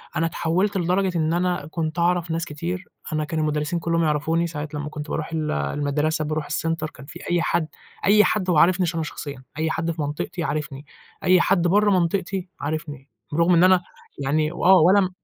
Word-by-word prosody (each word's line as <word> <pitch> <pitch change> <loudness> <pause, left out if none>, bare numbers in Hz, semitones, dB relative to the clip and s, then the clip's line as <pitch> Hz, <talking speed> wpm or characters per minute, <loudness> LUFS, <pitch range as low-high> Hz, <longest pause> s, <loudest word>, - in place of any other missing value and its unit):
أنا 165 - +1
اتحولت 180 +5 0
لدرجة 180 +1 +1
إن 160 0 +1
أنا 175 -3 0
كُنت 165 +1 -2
أعرف 175 -1 +1
ناس 165 +1 -1
كتير، 170 +5 -5 0.3
أنا 155 0 0
كان 160 +1 -3
المدرسين 150 +2 -1
كلّهم 165 0 0
يعرفوني 160 +2 +1
ساعات 150 -2 -6
لمّا 150 0 -4
كُنت 150 0 -7
باروح 155 +1 -3
ال 155 -1 -1
المدرسة 145 - -1
باروح 155 0 -2
الCenter 165 +1 -1
كان 130 - -12
في 155 +4 -10
أي 175 - +2
حد، 170 -1 0 0.4
أي 210 +1 +6
حد 190 -4 0
وعارفني 180 +3 +4
ش - - 0
ش - - -9
أنا 165 - -1
شخصيًا، 145 -3 -7
أي 160 0 0
حد 165 +1 -1
في 160 -1 -5
منطقتي 150 +4 -3
عارفني، 150 -2 -4 0.4
أي 185 -1 +5
حد 175 -3 +2
برّة 205 +3 +4
منطقتي 185 +1 0
عارفني، 145 -2 -5 0.2
بالرغم 170 +4 +3
إن 170 0 +5
أنا، 185 -1 +6 0.4
يعني 155 +3 +1
وآه 180 +2 +4
ولا 190 +5 +6
م. 185 - 0
165 Hz, 195 wpm, -23 LUFS, 150-180 Hz, 0.4 s, أي